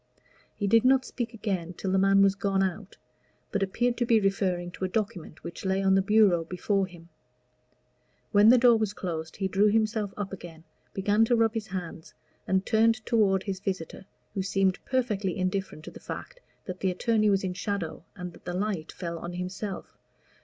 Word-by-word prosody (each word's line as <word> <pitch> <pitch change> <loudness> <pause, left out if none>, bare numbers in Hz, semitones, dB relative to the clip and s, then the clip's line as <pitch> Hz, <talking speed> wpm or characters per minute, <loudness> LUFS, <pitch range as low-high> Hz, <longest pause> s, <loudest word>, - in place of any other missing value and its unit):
He 205 - -2
did 225 +3 +4
not 260 0 +4
speak 240 -2 -4
again 195 -6 -3
till 190 +1 -3
the 190 - +3
man 195 +1 +5
was 195 -1 +4
gone 195 -1 0
out, 190 +1 -4 0.5
but 205 - -1
appeared 235 +5 0
to 240 - +1
be 230 -2 +5
referring 190 -3 0
to 185 - -8
a - - +2
document 185 -6 -4
which 170 - -8
lay 190 0 0
on 190 0 +4
the 195 - +4
bureau 200 -4 +4
before 190 +3 -1
him. 170 -2 -15 1.2
When 205 +1 +6
the 250 - +8
door 240 -1 +6
was 215 -2 -1
closed 160 -3 -5
he 195 - -1
drew 200 +2 +3
himself 215 -1 +1
up 200 -1 -4
again, 170 -3 -10 0.3
began 205 +3 +3
to 240 - +2
rub 225 -1 +2
his 220 -2 -4
hands, 175 -4 -7 0.3
and 190 +1 +1
turned 225 -1 +2
toward 195 -5 +2
his 195 -2 -4
visitor, 190 -1 -5 0.3
who 195 - -1
seemed 195 -1 0
perfectly 210 -8 -1
indifferent 185 -4 -2
to - - -8
the - - -12
fact - - -8 0.3
that 185 -1 -6
the 190 - +1
attorney 215 +3 +2
was 195 -1 +2
in 185 -1 -2
shadow, 185 -4 -4
and 180 -2 -7
that - - -17
the 175 - -3
light 190 -4 -2
fell 170 -2 -5
on 175 +1 -6
himself. 185 +3 -6
195 Hz, 195 wpm, -28 LUFS, 185-215 Hz, 1.2 s, the